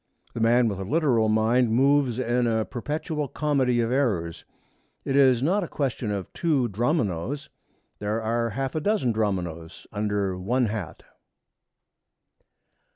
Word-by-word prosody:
The -, -, -5 dB
man 120 Hz, +1 st, +4 dB
with 100 Hz, -3 st, -3 dB
a -, -, -3 dB
literal 120 Hz, -, +2 dB
mind 110 Hz, +2 st, +2 dB
moves 135 Hz, -1 st, +3 dB
in 120 Hz, -1 st, +1 dB
a 110 Hz, -1 st, +1 dB
perpetual 150 Hz, +3 st, -3 dB
comedy 130 Hz, -4 st, +1 dB
of 115 Hz, +1 st, -1 dB
errors. 90 Hz, -12 st, -1 dB, 0.6 s
It 135 Hz, -, -1 dB
is 130 Hz, -3 st, +5 dB
not 190 Hz, +7 st, +2 dB
a -, -, -4 dB
question 130 Hz, -7 st, -2 dB
of 100 Hz, -3 st, -4 dB
two 145 Hz, -8 st, +1 dB
Dromios. 120 Hz, -, -1 dB, 0.5 s
There 105 Hz, +2 st, -1 dB
are 115 Hz, +1 st, -1 dB
half 135 Hz, +4 st, -3 dB
a 155 Hz, -, -1 dB
dozen 200 Hz, -, +1 dB
Dromios 90 Hz, -7 st, -3 dB
under 105 Hz, -3 st, -1 dB
one 120 Hz, +7 st, +1 dB
hat. 105 Hz, -6 st, -5 dB
120 Hz, 140 wpm, -25 LUFS, 105-135 Hz, 0.6 s, is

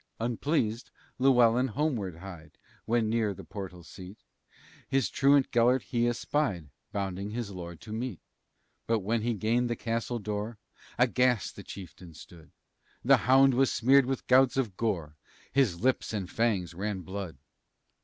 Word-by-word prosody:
Unpleased, 120 Hz, 0 st, -1 dB, 0.3 s
Llewellyn 125 Hz, -1 st, +4 dB
homeward 115 Hz, -, -2 dB
hied, 85 Hz, -3 st, -11 dB, 0.3 s
When 115 Hz, -1 st, +1 dB
near 110 Hz, -3 st, 0 dB
the -, -, -10 dB
portal 95 Hz, -4 st, -8 dB
seat, 95 Hz, +4 st, -11 dB, 0.7 s
His 135 Hz, -2 st, +1 dB
truant 140 Hz, 0 st, +3 dB
Gelert 120 Hz, +2 st, +3 dB
he 120 Hz, -2 st, 0 dB
espied, 115 Hz, -, -1 dB, 0.2 s
Bounding 100 Hz, 0 st, -3 dB
his 110 Hz, -1 st, -4 dB
lord 85 Hz, -3 st, -8 dB
to 110 Hz, -, -8 dB
meet. 115 Hz, -5 st, -4 dB, 0.7 s
But 115 Hz, -2 st, +1 dB
when 110 Hz, +4 st, 0 dB
he 115 Hz, +1 st, -1 dB
gained 120 Hz, +4 st, +1 dB
the 120 Hz, -, -1 dB
castle 115 Hz, +1 st, -2 dB
door, 105 Hz, +1 st, -4 dB, 0.4 s
Aghast 125 Hz, -2 st, +2 dB
the -, -, -8 dB
chieftain 90 Hz, -3 st, -11 dB
stood; 80 Hz, -1 st, -14 dB, 0.6 s
The -, -, +7 dB
hound 135 Hz, +1 st, +6 dB
was 135 Hz, +1 st, +3 dB
smeared 135 Hz, +2 st, +4 dB
with 135 Hz, 0 st, -3 dB
gouts 130 Hz, 0 st, +4 dB
of 115 Hz, -8 st, -1 dB
gore, 85 Hz, -10 st, -2 dB, 0.3 s
His 115 Hz, -11 st, +1 dB
lips 130 Hz, -2 st, +1 dB
and 100 Hz, -4 st, -3 dB
fangs 100 Hz, -5 st, 0 dB
ran 100 Hz, +2 st, -3 dB
blood. 95 Hz, -5 st, -6 dB
115 Hz, 145 wpm, -29 LUFS, 95-125 Hz, 0.7 s, The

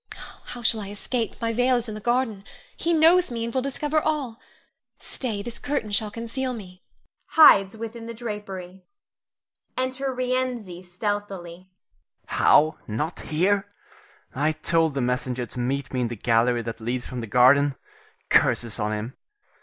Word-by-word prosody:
How 245 Hz, -, -8 dB
shall 225 Hz, 0 st, +3 dB
I 200 Hz, -, -7 dB
escape, 225 Hz, +3 st, -3 dB
my 230 Hz, -1 st, -1 dB
veil 250 Hz, +2 st, +3 dB
is 240 Hz, -1 st, -2 dB
in 215 Hz, -, -5 dB
the 215 Hz, -, -7 dB
garden! 240 Hz, -3 st, 0 dB, 0.3 s
He 340 Hz, -, -1 dB
knows 335 Hz, +2 st, +5 dB
me 230 Hz, -2 st, -3 dB
and 235 Hz, -, -5 dB
will 260 Hz, -, +1 dB
discover 295 Hz, +3 st, -1 dB
all. 280 Hz, -7 st, -2 dB, 0.6 s
Stay! 220 Hz, -6 st, -4 dB
this 235 Hz, +1 st, -7 dB
curtain 280 Hz, -7 st, -2 dB
shall 210 Hz, +1 st, +2 dB
conceal 235 Hz, +4 st, -4 dB
me 185 Hz, -5 st, -10 dB, 0.5 s
[hides 200 Hz, -10 st, +6 dB
within 230 Hz, +1 st, -7 dB
the 230 Hz, -, -5 dB
drapery]. 195 Hz, -5 st, -6 dB, 1.0 s
[Enter 260 Hz, +1 st, -1 dB
Rienzi 250 Hz, -7 st, -2 dB
stealthily. 185 Hz, -1 st, -5 dB
Rienzi. 90 Hz, -, -14 dB
How! 155 Hz, +1 st, +5 dB
not 150 Hz, +10 st, -3 dB
here? 195 Hz, +5 st, 0 dB, 0.6 s
I 150 Hz, +4 st, +1 dB
told 160 Hz, -1 st, +1 dB
the 135 Hz, -, 0 dB
messenger 125 Hz, 0 st, -1 dB
to 125 Hz, -, -8 dB
meet 135 Hz, +3 st, -2 dB
me 130 Hz, -, 0 dB
in 120 Hz, -, +1 dB
the 120 Hz, -, -5 dB
gallery 115 Hz, +2 st, +2 dB
that 115 Hz, 0 st, -6 dB
leads 120 Hz, +2 st, -2 dB
from 125 Hz, -1 st, -5 dB
the 115 Hz, -, -6 dB
garden. 135 Hz, +5 st, +5 dB, 0.5 s
Curses 115 Hz, -3 st, +3 dB
on 105 Hz, +1 st, -1 dB
him! 110 Hz, +5 st, -5 dB
200 Hz, 160 wpm, -25 LUFS, -, 1.0 s, hides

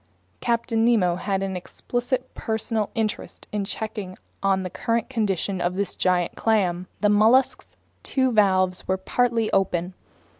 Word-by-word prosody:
Captain 230 Hz, -1 st, 0 dB
Nemo 210 Hz, -7 st, +3 dB
had 195 Hz, +1 st, -1 dB
an 190 Hz, -1 st, -3 dB
explicit 245 Hz, +7 st, -3 dB
personal 220 Hz, -1 st, -2 dB
interest 220 Hz, -2 st, -3 dB
in 210 Hz, -1 st, -1 dB
checking 195 Hz, -2 st, -5 dB, 0.2 s
on 195 Hz, -1 st, +2 dB
the 185 Hz, -, -4 dB
current 230 Hz, +5 st, -1 dB
condition 195 Hz, -5 st, -1 dB
of 175 Hz, +1 st, 0 dB
this 200 Hz, +1 st, -2 dB
giant 180 Hz, -2 st, +1 dB
clam. 185 Hz, -5 st, +1 dB
The 210 Hz, -, +4 dB
mollusk's 220 Hz, +6 st, +3 dB, 0.3 s
two 260 Hz, -2 st, +1 dB
valves 185 Hz, -4 st, +3 dB
were 190 Hz, -, +1 dB
partly 230 Hz, +3 st, 0 dB
open. 180 Hz, -2 st, 0 dB
205 Hz, 140 wpm, -24 LUFS, 185-230 Hz, 0.3 s, The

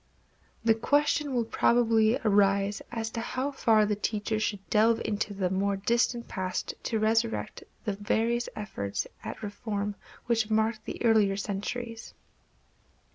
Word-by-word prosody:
The 230 Hz, -1 st, +5 dB
question 290 Hz, +5 st, +1 dB
will 235 Hz, -2 st, +1 dB
probably 225 Hz, 0 st, +3 dB
arise 200 Hz, 0 st, +3 dB
as 225 Hz, -1 st, -3 dB
to 230 Hz, -, -3 dB
how 260 Hz, +4 st, -2 dB
far 220 Hz, -5 st, +3 dB
the 210 Hz, 0 st, 0 dB
teacher 215 Hz, +1 st, -1 dB
should 205 Hz, -2 st, -2 dB
delve 225 Hz, +1 st, +4 dB
into 210 Hz, 0 st, -1 dB
the 190 Hz, -2 st, -1 dB
more 195 Hz, +1 st, +1 dB
distant 235 Hz, +3 st, +1 dB
past 185 Hz, -3 st, -3 dB
to 225 Hz, -, 0 dB
resurrect 225 Hz, +1 st, 0 dB, 0.2 s
the 210 Hz, -, 0 dB
various 225 Hz, +4 st, 0 dB
efforts 100 Hz, -, -3 dB, 0.2 s
at -, -, -7 dB
reform 205 Hz, 0 st, -3 dB, 0.3 s
which 225 Hz, -2 st, +1 dB
marked 220 Hz, 0 st, +1 dB
the -, -, -4 dB
earlier 210 Hz, -4 st, +4 dB
centuries. 225 Hz, +4 st, -5 dB
220 Hz, 135 wpm, -28 LUFS, 205-230 Hz, 0.3 s, The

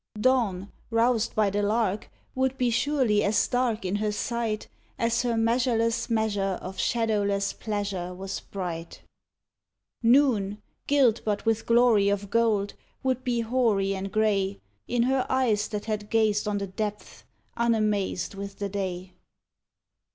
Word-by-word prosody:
Dawn, 210 Hz, -6 st, +1 dB, 0.2 s
roused 230 Hz, 0 st, +1 dB
by 210 Hz, -2 st, +2 dB
the 205 Hz, +1 st, 0 dB
lark, 210 Hz, -1 st, 0 dB, 0.2 s
would 265 Hz, 0 st, 0 dB
be 245 Hz, -2 st, +1 dB
surely 250 Hz, -5 st, +2 dB
as 205 Hz, +1 st, +2 dB
dark 245 Hz, -5 st, 0 dB
in 190 Hz, +2 st, 0 dB
her 210 Hz, 0 st, 0 dB
sight 225 Hz, 0 st, -2 dB, 0.3 s
As 230 Hz, 0 st, +1 dB
her 240 Hz, -2 st, 0 dB
measureless 230 Hz, 0 st, +1 dB
measure 205 Hz, -4 st, 0 dB
of 185 Hz, 0 st, -8 dB
shadowless 205 Hz, -4 st, 0 dB
pleasure 200 Hz, -4 st, -3 dB
was 190 Hz, +1 st, -5 dB
bright. 170 Hz, -4 st, -6 dB, 1.0 s
Noon, 230 Hz, -5 st, +3 dB, 0.3 s
gilt 265 Hz, -6 st, +3 dB
but 210 Hz, 0 st, -2 dB
with 225 Hz, -1 st, 0 dB
glory 230 Hz, -4 st, +5 dB
of 200 Hz, 0 st, -2 dB
gold, 220 Hz, -3 st, +2 dB, 0.3 s
would 260 Hz, -1 st, 0 dB
be 240 Hz, -2 st, 0 dB
hoary 225 Hz, -5 st, +1 dB
and 195 Hz, 0 st, -4 dB
grey 200 Hz, -2 st, +1 dB, 0.3 s
In 240 Hz, -1 st, +1 dB
her 260 Hz, +1 st, +2 dB
eyes 230 Hz, -6 st, +1 dB
that 210 Hz, -2 st, -5 dB
had 210 Hz, -1 st, -3 dB
gazed 215 Hz, -2 st, +2 dB
on 205 Hz, -1 st, 0 dB
the 200 Hz, -, -2 dB
depths, 210 Hz, +2 st, -5 dB, 0.3 s
unamazed 215 Hz, -6 st, 0 dB
with 200 Hz, 0 st, -7 dB
the 200 Hz, -1 st, -3 dB
day. 185 Hz, -2 st, -4 dB
215 Hz, 140 wpm, -26 LUFS, 200-235 Hz, 1.0 s, glory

